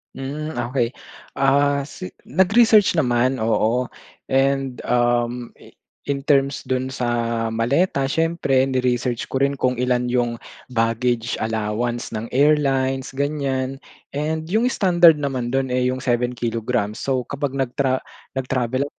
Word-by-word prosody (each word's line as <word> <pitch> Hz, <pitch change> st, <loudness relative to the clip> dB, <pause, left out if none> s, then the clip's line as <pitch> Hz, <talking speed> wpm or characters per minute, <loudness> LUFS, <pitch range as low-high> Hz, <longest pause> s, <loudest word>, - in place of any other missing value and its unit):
Hmm, 150 Hz, +4 st, -5 dB, 0.2 s
okey. 125 Hz, -2 st, 0 dB, 0.4 s
Ah, 140 Hz, +1 st, +2 dB
si 180 Hz, +6 st, -8 dB, 0.2 s
nag-research 210 Hz, +1 st, +4 dB
naman, 125 Hz, -3 st, +2 dB
oo. 110 Hz, +2 st, +1 dB, 0.5 s
And, 135 Hz, -1 st, +1 dB
um, 120 Hz, 0 st, +1 dB
i -, -, -17 dB, 0.3 s
in 140 Hz, -1 st, -2 dB
terms 140 Hz, -1 st, +2 dB
dun 130 Hz, 0 st, 0 dB
sa 115 Hz, -2 st, -1 dB
maleta, 135 Hz, +6 st, +1 dB
siyempre 160 Hz, -3 st, +1 dB
ni-research 125 Hz, -2 st, 0 dB
ko 135 Hz, -, -3 dB
rin 140 Hz, 0 st, +1 dB
kung 130 Hz, -1 st, +1 dB
ilan 125 Hz, 0 st, 0 dB
yung 120 Hz, -1 st, 0 dB, 0.3 s
baggage 115 Hz, 0 st, 0 dB
allowance 110 Hz, +2 st, -2 dB
ng 110 Hz, +1 st, -4 dB
airlines 135 Hz, -2 st, +2 dB
ganiyan, 135 Hz, -1 st, -2 dB, 0.3 s
and 155 Hz, +2 st, -2 dB
yung 220 Hz, +8 st, +1 dB
standard 175 Hz, -8 st, +5 dB
naman 130 Hz, -4 st, -2 dB
do'n, 130 Hz, -1 st, -1 dB
eh, 125 Hz, 0 st, +2 dB
yung 130 Hz, -, -2 dB
7 125 Hz, -1 st, -1 dB
kilograms 115 Hz, -2 st, -2 dB
So, 130 Hz, -2 st, -1 dB
kapag 140 Hz, +1 st, -3 dB
nagtra 130 Hz, 0 st, 0 dB, 0.3 s
nag-travel, 130 Hz, +1 st, -1 dB
130 Hz, 125 wpm, -21 LUFS, 120-140 Hz, 0.5 s, standard